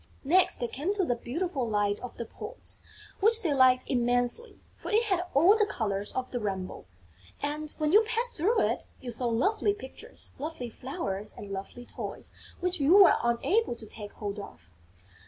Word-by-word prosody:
Next 355 +7 +4
they 240 - -2
came 315 - -2
to 385 -3 +1
the 245 - +1
beautiful 265 +1 -2
Light 205 -1 +1
of 250 - -8
the 235 - -4
Poets, - - -5 0.4
which 450 +3 +3
they 320 -5 +2
liked 255 -1 +5
immensely, 245 - 0 0.2
for - - -8
it 440 +2 +3
had 375 -5 0
all 345 +9 +7
the 425 -1 +3
colours 205 - -2
of 255 0 -3
the 245 - -2
rainbow; 190 -4 -4 0.5
and, 300 +1 -2
when 305 -1 +1
you 420 +4 +8
passed 460 +2 -1
through 410 +10 +2
it, - - 0
you 245 - -6
saw 240 +1 -1
lovely 400 - +1
pictures, 420 - -7
lovely 280 -5 -5
flowers 215 - -5
and 200 - -8
lovely 195 +5 -7
toys - - -6 0.3
which 360 -1 0
you 290 +6 +5
were 400 -2 +8
unable 240 - +1
to 230 - -10
take 210 -1 -9
hold 205 -1 -5
of. 90 - -11
260 Hz, 180 wpm, -29 LUFS, 230-375 Hz, 0.5 s, you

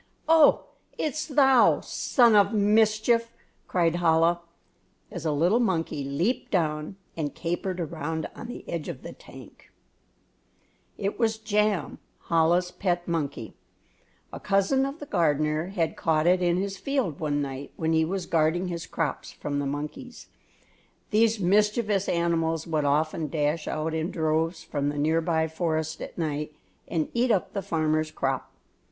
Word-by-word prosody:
"Oh, 320 -2 +6 0.3
it's 305 0 -2
thou, 270 -4 +5
son 235 -4 +3
of 200 +1 +4
mischief!" 215 +2 +3 0.4
cried 170 -2 +1
Chola, 165 0 +3 0.7
as 170 -3 -4
a - - +1
little 175 +10 +2
monkey 165 - -1
leaped 160 - -1
down 155 -1 -1 0.2
and 150 -3 -3
capered 180 +2 -3
around 160 -1 -3
on - - -8
the 245 - -9
edge 165 -3 -4
of - - -7
the - - -8
tank. - - -15 1.3
It 200 +3 -3
was 225 -2 +1
Jam, 210 -5 0 0.3
Chola's 170 +2 +3
pet 175 -2 -2
monkey. 145 -9 -3 0.8
A - - -6
cousin 205 +7 +2
of 275 +2 -6
the 290 - -8
gardener 155 - +1
had 175 -4 -1
caught 155 -1 +1
it 180 +1 +4
in 175 0 +2
his 195 +1 -2
field 265 - -2
one 145 -2 -1
night 140 -1 -5
when 160 0 -1
he 160 0 +3
was 185 +2 -2
guarding 165 +3 +1
his 170 -1 -5
crops 160 -4 -3
from 145 -1 -4
the 140 - -2
monkeys. 150 - -6 0.8
These 225 0 +3
mischievous 210 +1 +2
animals 165 -2 0
would 155 -3 -1
often 155 +2 +1
dash 150 +1 -1
out 155 +1 -2
in 160 +2 -1
droves 160 -1 -1
from 145 -1 -2
the 145 - -4
near 160 +3 +2
by 160 -1 +1
forest 160 -1 -2
at - - -8
night 150 -2 -3 0.3
and 160 -3 -1
eat 245 +2 +1
up 200 -6 +1
the 200 - -2
farmers' 155 -4 0
crop. 135 -3 -2
170 Hz, 150 wpm, -26 LUFS, 155-205 Hz, 1.3 s, Oh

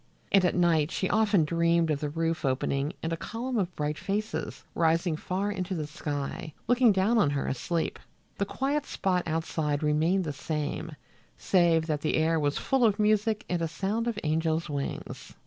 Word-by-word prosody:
And 195 -2 +5
at 180 - +2
night 165 -4 +3
she 190 - -1
often 205 -6 +3
dreamed 170 0 +2
of 145 - 0
the 150 - -2
roof 165 +2 -1
opening 135 +2 0
and 165 +1 -1
a - - -2
column 235 +5 -3
of 180 -3 -2
bright 150 0 -2
faces, 205 +3 -3
rising 165 0 +2
far 190 +6 -2
into 185 -1 -3
the 155 -3 -2
sky, 150 +1 -5
looking 245 -1 +5
down 205 +4 +3
on 155 - +4
her 140 -1 -1
asleep. 165 +5 -2 0.4
The 200 - +2
quiet 280 +5 -1
spot 185 -2 0
outside 160 -2 -1
remained 160 +6 +2
the 150 -4 -3
same, 150 +2 -3 0.4
save 170 -3 +3
that 155 -3 -1
the 155 - 0
air 160 +1 +2
was 145 -1 0
full 270 -2 +1
of 215 -3 +4
music 215 0 +2
and 175 -2 -1
a 165 - +1
sound 205 +8 -2
of 230 -3 -1
angels' 160 +1 0
wings. 140 -1 -5
170 Hz, 180 wpm, -28 LUFS, 155-200 Hz, 0.4 s, And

